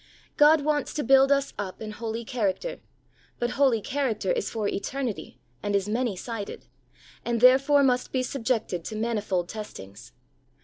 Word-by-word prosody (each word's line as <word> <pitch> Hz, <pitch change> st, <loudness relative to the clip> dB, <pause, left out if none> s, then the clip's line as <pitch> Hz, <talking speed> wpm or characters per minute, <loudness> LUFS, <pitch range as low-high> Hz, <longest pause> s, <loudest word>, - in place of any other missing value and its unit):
God 300 Hz, +1 st, +6 dB
wants 295 Hz, 0 st, -1 dB
to 295 Hz, -, -1 dB
build 270 Hz, +2 st, +5 dB
us 280 Hz, 0 st, +2 dB
up 190 Hz, -2 st, -5 dB
in 215 Hz, -1 st, -6 dB
holy 225 Hz, +1 st, -5 dB
character, 235 Hz, -, -2 dB, 0.6 s
but 240 Hz, 0 st, -1 dB
holy 250 Hz, -3 st, +3 dB
character 260 Hz, -, -1 dB
is -, -, -1 dB
for 215 Hz, -2 st, -2 dB
eternity 230 Hz, -, -4 dB, 0.2 s
and 205 Hz, 0 st, -1 dB
is 200 Hz, 0 st, +1 dB
many 230 Hz, 0 st, -1 dB
sided, 210 Hz, +2 st, -6 dB, 0.6 s
and 235 Hz, -1 st, -1 dB
therefore 270 Hz, +4 st, +6 dB
must 250 Hz, -2 st, +1 dB
be 260 Hz, -1 st, 0 dB
subjected 230 Hz, -9 st, -2 dB
to 215 Hz, -, -5 dB
manifold 210 Hz, -5 st, -1 dB
testings. 120 Hz, -, -9 dB
235 Hz, 150 wpm, -26 LUFS, 210-270 Hz, 0.6 s, God